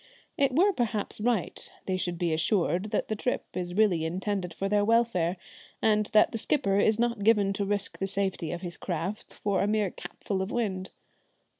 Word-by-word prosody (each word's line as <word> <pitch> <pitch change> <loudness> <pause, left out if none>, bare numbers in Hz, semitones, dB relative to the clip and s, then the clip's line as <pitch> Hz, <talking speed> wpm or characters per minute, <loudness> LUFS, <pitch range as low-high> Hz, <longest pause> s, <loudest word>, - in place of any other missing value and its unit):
It 270 -2 +2
were 390 +6 +5
perhaps 220 - -2
right 225 -5 -1 0.2
they 190 - 0
should 180 -2 -2
be 170 -1 0
assured 175 +2 +1
that 215 - -1
the 215 - -1
trip 250 +4 -2
is 180 -1 -4
really 195 -6 +3
intended 185 +2 -2
for 195 +4 -3
their 205 0 +2
welfare, 205 -6 +2 0.4
and 215 -1 +2
that 215 - +4
the 225 - -3
skipper 200 -7 +1
is 215 +1 +3
not 235 -3 0
given 205 -2 +4
to 200 +1 -1
risk 200 0 -1
the 195 - -1
safety 190 -4 -2
of 175 - -4
his 175 -1 -5
craft 180 +4 -4
for 200 -2 0
a 200 - +1
mere 210 -3 +1
capful 195 -2 -4
of 190 - -3
wind. 190 -6 -2
200 Hz, 190 wpm, -28 LUFS, 185-215 Hz, 0.4 s, were